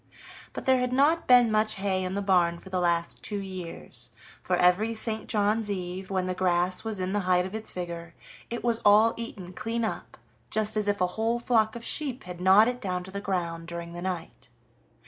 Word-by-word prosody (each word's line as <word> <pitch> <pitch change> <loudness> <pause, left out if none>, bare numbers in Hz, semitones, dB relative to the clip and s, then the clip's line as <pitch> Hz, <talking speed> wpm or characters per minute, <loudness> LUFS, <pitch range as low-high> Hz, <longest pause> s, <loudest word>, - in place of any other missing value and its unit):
But - - -6
there 260 -1 +4
had 250 0 -1
not 290 +6 +3
been 245 -2 +6
much 215 0 +2
hay 190 -1 -1
in 185 +1 -3
the 200 - -1
barn 175 -3 +3
for 190 +2 -13
the 185 - 0
last 170 -1 0
two 205 - -3
years, 175 -10 -5 0.3
for 185 - 0
every 185 +6 +3
St. 220 0 -3
John's 210 +1 +1
eve, 185 -1 -4
when 190 -2 0
the 185 - -1
grass 180 0 +2
was 220 -3 -3
in 185 +1 -2
the 205 - +2
height 180 0 +4
of 190 - -7
its 220 0 -3
vigor, 170 -2 -6 0.3
it 235 - -4
was 235 -1 +2
all 215 +2 +6
eaten 195 -6 -7
clean 225 +3 -2
up, - - -5 0.3
just 215 0 -1
as 210 -1 0
if 205 -2 0
a - - +5 0.2
whole 230 +1 +2
flock 225 -2 +2
of 235 0 -7
sheep 270 -4 -2
had 180 -1 -8
gnawed 195 +4 +6
it 250 0 -2
down 180 -2 -2
to 190 - -9
the 200 +1 -5
ground 170 -4 -3
during 170 0 -6
the 175 - -6
night. 180 -2 -5
195 Hz, 215 wpm, -27 LUFS, 180-220 Hz, 0.3 s, been